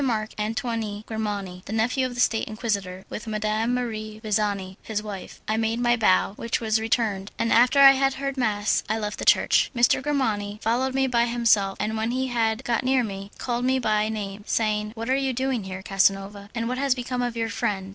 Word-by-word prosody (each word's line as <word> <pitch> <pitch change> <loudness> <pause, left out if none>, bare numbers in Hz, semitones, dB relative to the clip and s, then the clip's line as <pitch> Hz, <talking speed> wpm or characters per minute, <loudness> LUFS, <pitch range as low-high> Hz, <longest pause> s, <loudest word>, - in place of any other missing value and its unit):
Marc 220 -5 -1
Antoine 220 -1 -2
Grimani, 205 -5 -4
the - - -8
nephew 245 +4 +1
of 245 - -8
the - - -6
State 225 -2 +2
Inquisitor, 200 -4 -3
with 220 - -7
Madame 215 +2 0
Marie 215 -3 -4
Visani, 200 -3 -1
his 215 -1 -3
wife. 205 -3 -8
I 215 - 0
made 225 +1 0
my 240 0 +3
bow; 195 -4 +3
which 230 0 -1
was 220 -1 +1
returned, 215 -3 0
and 230 - +1
after 245 +4 +5
I 275 -1 +10
had 270 0 +1
heard 275 0 -3
mass 215 -5 +1
I 220 - +1
left 210 -1 -4
the - - -4
church. - - +4
M. 235 - -1 0.2
Grimani 215 -8 -1
followed 255 +4 0
me 270 0 +3
by 240 -2 +2
himself, 230 -5 +2
and 215 +2 -1
when 220 +1 -1
he 260 +2 -1
had 225 0 0
got 240 0 0
near 260 -1 +2
me, 195 -2 -6
called 245 -1 -2
me 260 +1 +2
by 215 -3 +1
name, 205 -2 -5
saying, 215 -1 0
"What 230 0 -5
are 260 - +2
you 270 -1 0
doing 260 -4 -1
here, 190 0 -6
Casanova, 195 +1 0
and 230 -1 -1
what 255 +1 -2
has 275 -2 +2
become 250 0 -3
of 245 -1 -2
your 225 -1 -1
friend?" 205 -3 -2
220 Hz, 210 wpm, -25 LUFS, 210-245 Hz, 0.2 s, I